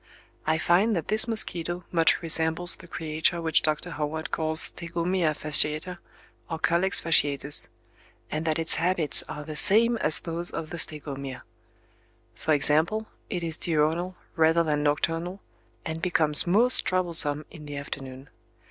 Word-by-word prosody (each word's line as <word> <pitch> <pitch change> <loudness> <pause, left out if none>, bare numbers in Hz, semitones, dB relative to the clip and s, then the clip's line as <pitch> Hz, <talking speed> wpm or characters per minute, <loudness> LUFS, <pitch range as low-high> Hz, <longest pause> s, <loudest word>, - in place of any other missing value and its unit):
I 160 0 +2
find 190 +7 +2
that 165 -3 -4
this 215 +2 +2
mosquito 175 -6 -2
much 165 0 +2
resembles 165 +2 +1
the 170 - -15
creature 160 +1 -2
which 165 -1 +2
Dr. 155 +3 -2
Howard 155 +1 -4
calls 160 0 +2
Stegomyia 170 -1 -2
fasciata, 155 +4 +1 0.5
or 165 - -3
Culex 170 +4 +1
fasciatus: 145 -3 +2 0.6
and 155 +1 -3
that 155 -1 0
its 165 0 +5
habits 170 -3 +3
are 150 - -7
the 155 +1 -8
same 230 +8 +4
as 155 -7 +1
those 170 +1 -2
of 160 -1 -7
the 175 - -5
Stegomyia. 140 -4 -3 0.9
For 155 +6 0
example, 160 +10 +1 0.2
it 180 -5 -4
is 165 -1 -3
diurnal 165 +3 0 0.2
rather 160 +1 +3
than 150 -2 -1
nocturnal 165 +5 -1 0.5
and 160 0 -5
becomes 160 -3 +1
most 230 +8 +2
troublesome 165 -5 +3
in 150 -4 -12
the 145 -1 -7
afternoon. 135 -1 -8
160 Hz, 145 wpm, -26 LUFS, 150-175 Hz, 0.9 s, its